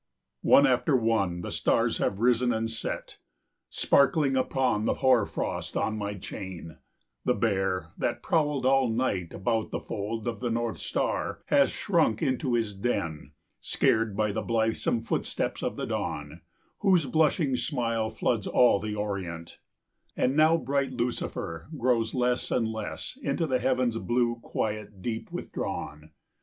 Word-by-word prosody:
] -, -, -57 dB
One 140 Hz, -, +6 dB
after 130 Hz, +2 st, +3 dB
one 110 Hz, -7 st, +1 dB
the -, -, -5 dB
stars -, -, +1 dB
have 95 Hz, -, 0 dB
risen 125 Hz, 0 st, +3 dB
and 115 Hz, 0 st, 0 dB
set, 110 Hz, -, -5 dB, 0.5 s
Sparkling 140 Hz, -1 st, +3 dB
upon 130 Hz, -4 st, +1 dB
the -, -, +1 dB
hoarfrost 125 Hz, -6 st, +1 dB
on 110 Hz, -, 0 dB
my 105 Hz, -1 st, -3 dB
chain: 90 Hz, -5 st, -8 dB, 0.4 s
The 125 Hz, -, +2 dB
Bear, 95 Hz, -6 st, 0 dB
that 120 Hz, 0 st, -1 dB
prowled 150 Hz, -5 st, +1 dB
all 135 Hz, -1 st, +4 dB
night 110 Hz, -7 st, -1 dB
about 110 Hz, +3 st, -1 dB
the -, -, -3 dB
fold 110 Hz, +3 st, -4 dB
Of 115 Hz, -3 st, -2 dB
the 125 Hz, -, -2 dB
North 115 Hz, -5 st, -2 dB
Star, -, -, -2 dB
hath -, -, +5 dB
shrunk 110 Hz, -1 st, +1 dB
into 130 Hz, -1 st, 0 dB
his 110 Hz, -3 st, 0 dB
den, 95 Hz, -7 st, -3 dB, 0.3 s
Scared 110 Hz, -3 st, +1 dB
by 105 Hz, -1 st, +1 dB
the 110 Hz, -, -2 dB
blithesome 115 Hz, 0 st, 0 dB
footsteps 115 Hz, -, -2 dB
of -, -, -2 dB
the -, -, -3 dB
Dawn, -, -, -3 dB
5 -, -, -12 dB, 0.4 s
Whose 185 Hz, -6 st, +4 dB
blushing 150 Hz, 0 st, +2 dB
smile 115 Hz, -3 st, -1 dB
floods 110 Hz, -3 st, -1 dB
all 120 Hz, -5 st, +5 dB
the 105 Hz, 0 st, -4 dB
Orient; 95 Hz, -5 st, -4 dB, 0.6 s
And 130 Hz, +2 st, +2 dB
now 155 Hz, +2 st, +5 dB
bright 140 Hz, -2 st, -1 dB
Lucifer 120 Hz, -9 st, -3 dB
grows 120 Hz, -2 st, +1 dB
less 125 Hz, -1 st, +1 dB
and 115 Hz, -2 st, +1 dB
less, 110 Hz, -, -5 dB
Into 170 Hz, -, 0 dB
the 130 Hz, -4 st, +1 dB
heaven's 125 Hz, -2 st, +1 dB
blue 120 Hz, 0 st, +1 dB
quiet 105 Hz, -4 st, -4 dB
deep 115 Hz, -2 st, -4 dB
withdrawn. 75 Hz, +1 st, -5 dB
115 Hz, 150 wpm, -28 LUFS, 105-130 Hz, 0.6 s, One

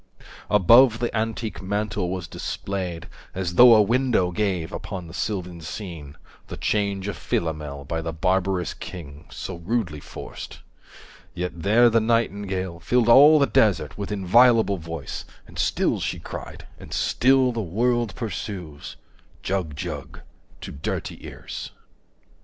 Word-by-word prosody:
Above 115 Hz, +4 st, +6 dB
the 120 Hz, 0 st, -2 dB
antique 110 Hz, 0 st, -2 dB
mantel 100 Hz, -1 st, -2 dB
was 90 Hz, -2 st, -4 dB
displayed 90 Hz, -1 st, -5 dB, 0.3 s
As 90 Hz, -2 st, -2 dB
though 120 Hz, +4 st, +9 dB
a 105 Hz, -, +6 dB
window 115 Hz, -5 st, +1 dB
gave 90 Hz, -4 st, -1 dB
upon 90 Hz, -2 st, -6 dB
the 80 Hz, -, -11 dB
sylvan 90 Hz, -4 st, -4 dB
scene 80 Hz, -4 st, -8 dB, 0.3 s
The -, -, -7 dB
change 100 Hz, -2 st, -1 dB
of 100 Hz, -, -3 dB
Philomel, 75 Hz, -3 st, -3 dB
by 80 Hz, +3 st, -3 dB
the 80 Hz, 0 st, -4 dB
barbarous 90 Hz, +2 st, 0 dB
king 85 Hz, -6 st, -9 dB
So -, -, -6 dB
rudely 85 Hz, -4 st, -2 dB
forced; -, -, -9 dB, 0.7 s
yet 90 Hz, +1 st, -2 dB
there 105 Hz, +8 st, +4 dB
the 115 Hz, -1 st, +3 dB
nightingale 100 Hz, -5 st, 0 dB
100 -, -, -21 dB
Filled 120 Hz, -2 st, +2 dB
all 145 Hz, +6 st, +8 dB
the 140 Hz, -, +4 dB
desert 95 Hz, -, +2 dB
with 100 Hz, 0 st, -5 dB
inviolable 110 Hz, +2 st, +4 dB
voice 80 Hz, -4 st, -6 dB, 0.2 s
And -, -, -11 dB
still -, -, +1 dB
she -, -, -2 dB
cried, -, -, -8 dB
and -, -, -12 dB
still 130 Hz, 0 st, +3 dB
the 115 Hz, -1 st, -3 dB
world 115 Hz, +4 st, 0 dB
pursues, 95 Hz, -8 st, -6 dB, 0.5 s
"Jug 90 Hz, -6 st, -2 dB
Jug" 70 Hz, -, -6 dB, 0.4 s
to -, -, -7 dB
dirty 70 Hz, -, -5 dB
ears. -, -, -7 dB
95 Hz, 140 wpm, -24 LUFS, 85-115 Hz, 0.7 s, though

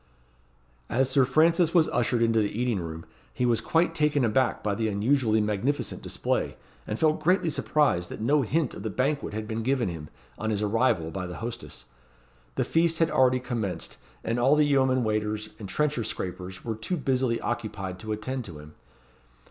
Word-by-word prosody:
As 130 Hz, +2 st, +1 dB
Sir 135 Hz, -1 st, +4 dB
Francis 165 Hz, +5 st, +3 dB
was 165 Hz, -2 st, +5 dB
ushered 120 Hz, -1 st, +1 dB
into 115 Hz, -1 st, +3 dB
the 105 Hz, +1 st, -1 dB
eating 120 Hz, -5 st, +1 dB
room, 80 Hz, -1 st, -6 dB, 0.3 s
he 125 Hz, -, -1 dB
was 120 Hz, -2 st, +3 dB
quite 165 Hz, 0 st, +2 dB
taken 150 Hz, -4 st, +2 dB
aback 120 Hz, +3 st, +1 dB
by 105 Hz, -, 0 dB
the 110 Hz, +2 st, -1 dB
unusually 110 Hz, +2 st, +2 dB
magnificent 105 Hz, +7 st, -1 dB
display, -, -, -2 dB, 0.3 s
and 105 Hz, -, -2 dB
felt 155 Hz, +2 st, +2 dB
greatly 170 Hz, 0 st, +2 dB
surprised 145 Hz, -, +1 dB
that -, -, -7 dB
no 140 Hz, +7 st, +3 dB
hint 145 Hz, +3 st, 0 dB
of -, -, -8 dB
the 110 Hz, -, -3 dB
banquet 135 Hz, +1 st, -1 dB
had 110 Hz, 0 st, -4 dB
been 110 Hz, +1 st, -3 dB
given 125 Hz, -3 st, +1 dB
him, 80 Hz, -3 st, -7 dB, 0.3 s
on 110 Hz, -, -2 dB
his 105 Hz, -1 st, 0 dB
arrival, 105 Hz, -6 st, +1 dB
by 90 Hz, 0 st, -4 dB
the 90 Hz, -, -7 dB
hostess. 120 Hz, +1 st, -6 dB, 0.7 s
The -, -, +1 dB
feast 165 Hz, 0 st, +2 dB
had 165 Hz, 0 st, +2 dB
already 130 Hz, -1 st, +4 dB
commenced; 110 Hz, -9 st, -4 dB, 0.3 s
and 115 Hz, +1 st, -1 dB
all 135 Hz, +5 st, +5 dB
the 150 Hz, 0 st, +4 dB
yeomen 130 Hz, -3 st, +3 dB
waiters 105 Hz, 0 st, -1 dB
and 100 Hz, -3 st, -7 dB
trencher 150 Hz, +2 st, 0 dB
scrapers 95 Hz, -2 st, -5 dB
were 115 Hz, -, -1 dB
too 110 Hz, -, -3 dB
busily 130 Hz, -4 st, 0 dB
occupied 100 Hz, -5 st, -4 dB
to 110 Hz, +1 st, -6 dB
attend 125 Hz, +5 st, -3 dB
to 85 Hz, -5 st, -8 dB
him. 75 Hz, +1 st, -12 dB
120 Hz, 185 wpm, -27 LUFS, 105-140 Hz, 0.7 s, was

